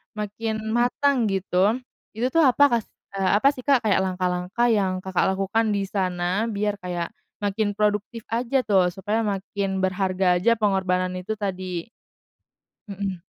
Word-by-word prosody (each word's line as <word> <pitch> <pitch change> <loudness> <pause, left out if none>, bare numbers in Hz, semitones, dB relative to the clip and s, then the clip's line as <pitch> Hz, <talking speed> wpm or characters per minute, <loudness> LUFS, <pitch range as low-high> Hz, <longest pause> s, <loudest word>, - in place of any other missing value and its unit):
makin 215 +1 -3
matang, 245 +1 +2
gitu. 195 +1 +1 0.4
Itu, 245 +4 -1
tuh, 325 -2 +5
apa 260 +3 +4 0.2
kah - - -7 0.4
eee, 190 - +2
apa, 245 +7 +4
sih, 275 - -12
Kak, 260 -2 +2
kayak 210 -2 +3
langkah-langkah 185 +5 0
yang 185 -3 0
Kakak 190 -1 +1
lakukan 210 +2 0
di 200 - 0
sana 185 +2 -1
biar 205 -1 -2
kayak 175 -2 -4 0.3
makin 205 0 0
produktif 210 +2 -1
aja, 245 +3 +1
tuh, 195 -5 +3
supaya 210 +3 -1
makin 195 -1 -2
berharga 185 -1 +1
aja 230 +6 +3
pengorbanan 190 -4 +1
itu 215 +4 -4
tadi? 185 -4 -4 1.1
Mhm. 195 -3 -4
200 Hz, 145 wpm, -24 LUFS, 185-225 Hz, 1.1 s, tuh